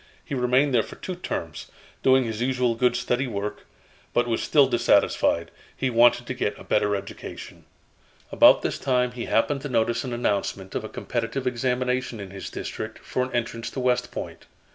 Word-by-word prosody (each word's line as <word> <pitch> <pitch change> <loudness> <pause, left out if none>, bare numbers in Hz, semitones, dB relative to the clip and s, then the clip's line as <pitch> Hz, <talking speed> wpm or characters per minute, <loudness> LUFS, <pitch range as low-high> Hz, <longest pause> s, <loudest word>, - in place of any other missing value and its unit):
He - - -6
remained 130 +2 +2
there 120 - +5
for - - -9
two 185 - -6
terms, 85 - -5 0.3
doing 130 0 +5
his 110 -1 -4
usual 125 -1 +1
good 120 +1 +2
steady 125 +1 0
work, 105 -2 -5 0.5
but 120 - +3
was 115 -1 0
still 145 -2 +5
dissatisfied. 115 -8 +2 0.3
He 130 - 0
wanted 120 +1 +5
to 130 - -3
get 105 -5 -2
a - - -11
better 105 -1 +1
education. 100 - -8 0.7
About - - +6
this - - -2
time 125 -2 +1
he 125 -1 -5
happened 140 +5 +1
to 145 - -5
notice 120 -1 +1
an 130 - -5
announcement 100 -5 -2
of - - -2
a - - -6
competitive 120 +2 -3
examination 125 -1 -1
in 100 -2 -7
his 95 -1 -7
district - - -6
for 130 - -1
an 125 0 -2
entrance 115 -1 -2
to - - -6
West 125 -1 +1
Point. - - -7
125 Hz, 185 wpm, -25 LUFS, 115-130 Hz, 0.7 s, About